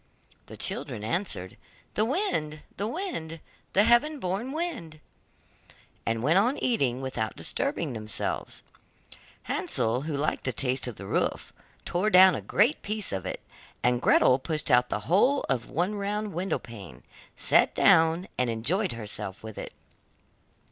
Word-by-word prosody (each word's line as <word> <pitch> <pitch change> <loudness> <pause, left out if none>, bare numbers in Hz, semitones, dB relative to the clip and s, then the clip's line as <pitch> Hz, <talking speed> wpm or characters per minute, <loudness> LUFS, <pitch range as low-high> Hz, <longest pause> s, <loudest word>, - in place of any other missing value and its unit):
The - - -10
children 105 - -3
answered: 110 - -1 0.4
'The 215 - +1
wind, 195 - -1
the 205 - -2
wind, 230 - -4 0.3
The 200 - +5
heaven 240 +7 +3
born 200 +6 -3
wind,' 275 - -4 1.1
and 115 0 0
went 160 +8 +4
on 245 +8 +1
eating 135 - 0
without 110 -5 -3
disturbing - - -1
themselves. 110 -2 -4 0.8
Hansel, 115 +3 0
who 150 0 -3
liked 150 +2 -1
the 130 - -1
taste 130 +1 0
of 120 - -5
the 100 - -9
roof, - - -1 0.3
tore 185 +5 0
down 185 -1 +8
a - - -3
great 150 - +2
piece 215 0 -1
of 95 -2 -3
it, - - -5 0.4
and 125 0 +2
Gretel 130 - +4
pushed 155 +1 -2
out 125 0 +4
the - - -2
whole 250 - +2
of 125 -4 -1
one 180 +7 0
round 205 0 -3
window 180 +4 -1
pane, 105 -7 -11 0.3
sat - - +3
down, 165 +3 +4
and 125 -1 +2
enjoyed 160 - 0
herself 105 -4 -6
with 110 -1 -8
it. - - -6
160 Hz, 150 wpm, -27 LUFS, -, 1.1 s, down